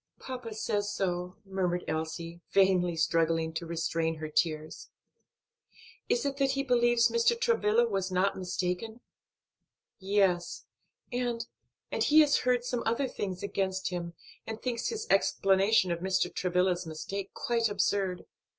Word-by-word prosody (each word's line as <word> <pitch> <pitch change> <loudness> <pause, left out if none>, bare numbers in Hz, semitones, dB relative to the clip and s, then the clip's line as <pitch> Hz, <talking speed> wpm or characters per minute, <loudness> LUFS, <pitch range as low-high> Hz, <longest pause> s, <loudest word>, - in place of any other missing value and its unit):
"Papa 250 -4 -6
says 205 -1 -1
so," 180 0 -2
murmured 180 -2 -1
Elsie, 160 +2 -4
vainly 185 -3 +3
struggling 165 0 +1
to 165 +1 -4
restrain 165 0 -1
her 155 0 -6
tears. 155 0 -1 1.2
"Is 245 - +1
it 280 -1 -1
that 275 -1 +2
he 275 0 0
believes 240 -2 +3
Mr. 470 0 +2
Travilla 240 - +3
was 195 -3 -2
not 185 +2 +1
mistaken?" 185 +5 -3 1.0
"Yes, 190 -3 +1 0.5
and 240 -2 -2 0.5
and - - 0
he 310 +1 +6
has 290 -1 +4
heard 250 -1 +1
some 245 -1 -2
other 235 +5 0
things 190 -6 -5
against 190 -2 -1
him, 170 -2 -5 0.3
and 220 0 -5
thinks 240 -2 -2
his 445 0 -3
explanation 195 0 +3
of 170 - -1
Mr. 185 0 0
Travilla's 180 -1 0
mistake 190 +5 -5
quite 230 -2 0
absurd. 195 -2 0
195 Hz, 135 wpm, -30 LUFS, 175-235 Hz, 1.2 s, he